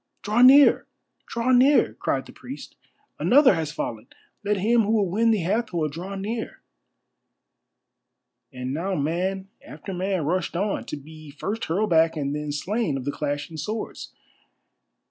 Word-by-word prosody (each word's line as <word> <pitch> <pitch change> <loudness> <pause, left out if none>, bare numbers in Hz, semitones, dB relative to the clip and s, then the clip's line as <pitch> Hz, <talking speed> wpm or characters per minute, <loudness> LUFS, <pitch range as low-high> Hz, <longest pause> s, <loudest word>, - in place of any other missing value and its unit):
"Draw 215 +4 +1
near! 275 +3 +7 0.4
Draw 235 +2 -1
near!" 260 +3 +4
cried - - -2
the - - -12
priest. - - -10 0.4
"Another 270 -2 +5
has 160 -3 -2
fallen! 115 -6 -5 0.4
Let 205 0 0
him 230 +5 +3
who 215 +1 0
would 200 -5 +1
win 230 +4 +2
the 215 -4 +2
Hathor 185 -4 -1
draw 180 +6 -6
near!" 220 +4 -5 1.9
And 125 +1 -5
now 185 +6 -2
man 185 +6 -2
after 160 +6 -9
man 185 -3 -1
rushed 180 +2 -1
on, 200 +3 -1
to - - -5
be 155 +1 -13
first 205 +10 -4
hurled 195 +5 -1
back 160 0 +3
and 140 -1 -2
then 150 0 -4
slain 175 +1 -1
of 130 - -6
the 145 - -1
clashing 145 +2 -4
swords. 215 +9 -5
185 Hz, 150 wpm, -24 LUFS, 155-215 Hz, 1.9 s, near